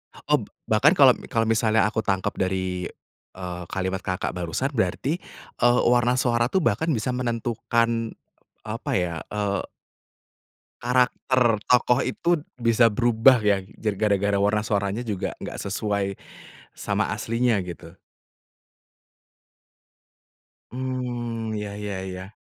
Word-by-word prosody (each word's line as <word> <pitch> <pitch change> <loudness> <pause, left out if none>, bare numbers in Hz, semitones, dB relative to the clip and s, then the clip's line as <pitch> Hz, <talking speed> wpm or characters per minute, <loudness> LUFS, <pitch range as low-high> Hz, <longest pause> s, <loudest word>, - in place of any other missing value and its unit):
Eb 150 -2 +1 0.3
bahkan 130 +9 +5
kalau 135 -5 +7
kalau 115 0 +1
misalnya, 110 0 +3
aku 110 +1 -2
tangkep 95 +1 0
dari, 95 -1 -1 0.5
eee, 90 -1 -6
kalimat 95 0 -2
Kakak 95 -1 -2
barusan, 90 - -2
berarti, 130 - 0 0.4
eee, 120 0 +5
warna 120 0 +3
suara 120 -2 +2
tuh 190 -4 +2
bahkan 115 +9 +1
bisa 125 -1 -1
menentukan, 115 -1 -1 0.5
apa - - -4
ya, 90 -2 0 0.2
eee 100 -2 -1 1.1
karakter 125 -1 +2
tokoh 125 0 +3
itu 175 0 +1 0.2
bisa 115 -1 +3
berubah 120 +2 +4
ya, 100 -2 +1 0.2
jar 105 -3 -1
gara-gara 100 -1 +2
warna 105 +2 +2
suaranya 100 +1 -1
juga 105 -6 -3
nggak - - -6
sesuai 100 -1 -2 0.6
sama - - -1
aslinya, 115 0 0
gitu. 85 0 -10 2.7
Mmm, 120 -3 -3
iya 105 -1 -4
iya 105 -2 -4
iya. 95 +2 -7
110 Hz, 115 wpm, -24 LUFS, 100-120 Hz, 2.7 s, kalau